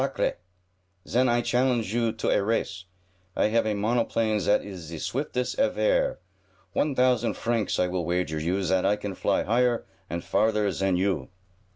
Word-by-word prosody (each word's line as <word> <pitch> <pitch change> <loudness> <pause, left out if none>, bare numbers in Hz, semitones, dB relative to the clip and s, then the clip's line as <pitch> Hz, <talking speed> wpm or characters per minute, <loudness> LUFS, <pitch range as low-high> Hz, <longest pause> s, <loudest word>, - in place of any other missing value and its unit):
Sacre! - - -1 0.7
Zen 125 +2 +2
I 120 0 +2
challenge 120 -4 +1
you 115 -1 +1
to 110 -1 -2
a - - +3
race. 100 -3 -2 0.5
I - - +2
have 115 0 +2
a 105 - 0
monoplane 110 0 +1
zat 100 +2 +2
is 95 -2 -7
ze 80 0 -8
swiftest 125 - -2
evaire! - - +2 0.6
One 150 -3 0
thousand 125 -2 +2
francs 115 -3 0
will 90 0 0
I - - -4
wager 85 -3 -1
you, 90 +5 -1
zat 95 0 +1
I 100 +2 +3
can 105 -1 -5
fly - - 0
higher 120 +2 +1 0.2
and 85 +2 -4
farther 105 -2 +1
zan 95 +1 0
you." 90 -8 0
110 Hz, 170 wpm, -26 LUFS, 95-120 Hz, 0.7 s, a